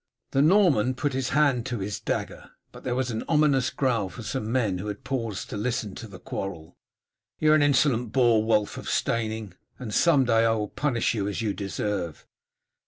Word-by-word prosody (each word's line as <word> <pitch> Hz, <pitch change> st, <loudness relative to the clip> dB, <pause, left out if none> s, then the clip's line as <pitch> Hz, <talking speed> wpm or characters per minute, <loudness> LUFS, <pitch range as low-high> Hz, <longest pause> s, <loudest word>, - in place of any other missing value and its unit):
The 135 Hz, -, +2 dB
Norman 150 Hz, -, +4 dB
put 145 Hz, +1 st, -1 dB
his 130 Hz, -1 st, -1 dB
hand 140 Hz, -5 st, +2 dB
to 125 Hz, -2 st, -3 dB
his 100 Hz, 0 st, -4 dB
dagger, -, -, -4 dB, 0.2 s
but -, -, -13 dB
there 125 Hz, -1 st, -1 dB
was 130 Hz, -1 st, -1 dB
an 110 Hz, -, -3 dB
ominous 145 Hz, -5 st, +3 dB
growl 115 Hz, -8 st, 0 dB
from 90 Hz, -, -9 dB
some 110 Hz, -1 st, -3 dB
men 110 Hz, -8 st, 0 dB
who 100 Hz, -, -5 dB
had 105 Hz, -1 st, -6 dB
paused 115 Hz, -7 st, -4 dB
to -, -, -4 dB
listen 110 Hz, -2 st, -2 dB
to 115 Hz, -, -8 dB
the 100 Hz, -3 st, -11 dB
quarrel. 90 Hz, -3 st, -6 dB, 0.6 s
"You 155 Hz, 0 st, +3 dB
are -, -, +7 dB
an 155 Hz, -, +4 dB
insolent 130 Hz, -5 st, +2 dB
boor, 120 Hz, -3 st, +4 dB
Wulf 105 Hz, -2 st, +1 dB
of -, -, -6 dB
Steyning, 110 Hz, -4 st, -1 dB, 0.2 s
and 110 Hz, -4 st, -6 dB
some 145 Hz, -3 st, +4 dB
day 115 Hz, -1 st, +3 dB
I 115 Hz, 0 st, +3 dB
will 105 Hz, -2 st, -2 dB
punish 130 Hz, -6 st, 0 dB
you 100 Hz, -3 st, -2 dB
as 105 Hz, +3 st, -3 dB
you 105 Hz, -2 st, 0 dB
deserve." 100 Hz, -4 st, -4 dB
115 Hz, 200 wpm, -26 LUFS, 105-135 Hz, 0.6 s, are